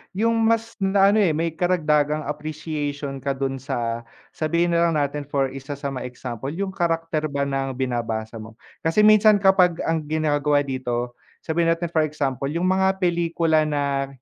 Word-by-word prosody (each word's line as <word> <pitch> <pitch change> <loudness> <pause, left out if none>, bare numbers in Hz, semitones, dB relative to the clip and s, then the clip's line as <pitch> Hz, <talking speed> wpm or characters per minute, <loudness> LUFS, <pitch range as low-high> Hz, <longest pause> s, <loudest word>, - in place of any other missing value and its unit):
yung 230 +2 +1
mas 225 0 0
na 195 0 +4
ano, 215 - +3
eh, 175 -7 +3
may 165 +1 -1
karagdagang 155 -3 +1
appreciation 150 -2 -4
ka 135 +1 -2
do'n 135 0 -2
sa, 120 -3 -3 0.2
sabihin 170 +2 0
na 170 0 +3
lang 165 - 0
natin 145 -1 -1
for 135 -2 0
isa 135 +1 -7
sa 140 0 -4
mga 130 -1 -5
example, 125 +1 -6
yung 195 0 -2
karacter 165 -3 -1
ba 140 -1 -2
ng 135 -1 -2
binabasa 115 -3 -3
mo. 110 +1 -11 0.3
Kasi 210 +6 +3
minsan 215 0 +7
kapag 190 -3 +3
ang 165 0 0
ginagawa 150 -2 +1
dito, 125 -3 -3 0.3
sabihin 165 +1 0
natin 170 0 -5
for 160 -2 +2
example, 135 -3 -2
yung 170 +5 -1
mga 190 0 +2
pelikula 165 -3 +2
na 140 -2 -1
150 Hz, 170 wpm, -23 LUFS, 135-170 Hz, 0.3 s, minsan